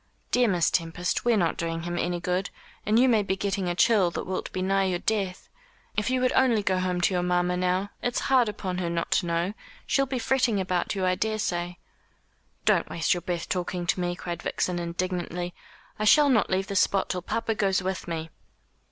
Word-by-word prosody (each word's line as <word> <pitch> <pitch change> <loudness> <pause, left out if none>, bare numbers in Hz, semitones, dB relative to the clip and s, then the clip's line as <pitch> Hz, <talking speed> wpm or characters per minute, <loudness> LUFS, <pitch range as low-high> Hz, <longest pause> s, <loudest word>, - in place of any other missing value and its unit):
"Dear 245 -1 +4
Miss 180 -5 +2
Tempest, 170 +3 -1
we're 235 -2 +4
not 170 -4 +1
doing 165 -1 -3
him 175 0 -3
any 175 0 -1
good, 180 +2 -1 0.4
and 215 +1 +3
you 255 +2 +5
may 225 -4 +4
be 190 -1 -1
getting 195 -2 -1
a 175 - -1
chill 195 -2 +4
that - - -4
will 185 0 -3
be 185 - -2
nigh 195 +1 +2
your 185 -2 0
death. 195 -2 -2 0.5
If 210 +2 0
you 255 0 +1
would 255 - +2
only 240 -5 +3
go 185 -1 +1
home 180 -1 -1
to 180 - +2
your 180 - +1
mamma, 180 0 +1
now 185 +2 0
it's 245 0 -1
hard 255 -4 +3
upon 190 -3 -4
her 175 -2 -1
not 170 0 -2
to 175 - +2
know 170 +3 0 0.3
she'll 275 -1 +1
be 260 0 -2
fretting 245 -4 +1
about 185 0 -1
you, 190 -1 0
I 185 - +3
daresay." 185 -4 -2 0.9
"Don't - - +3
waste 165 -1 +1
your 175 - -3
breath 175 -2 -3
talking 180 -1 -2
to 175 - 0
me," 175 0 -1
cried 175 -2 -5
Vixen 180 -1 -1
indignantly; 175 0 -3 0.5
"I 215 - 0
shall 290 +7 +6
not 220 -8 +3
leave 190 +1 +1
this 200 -2 0
spot 195 - +2
till 180 - -2
papa 225 +5 -1
goes 195 -3 +1
with 190 0 -3
me." 165 -1 -4
185 Hz, 215 wpm, -26 LUFS, 175-210 Hz, 0.9 s, shall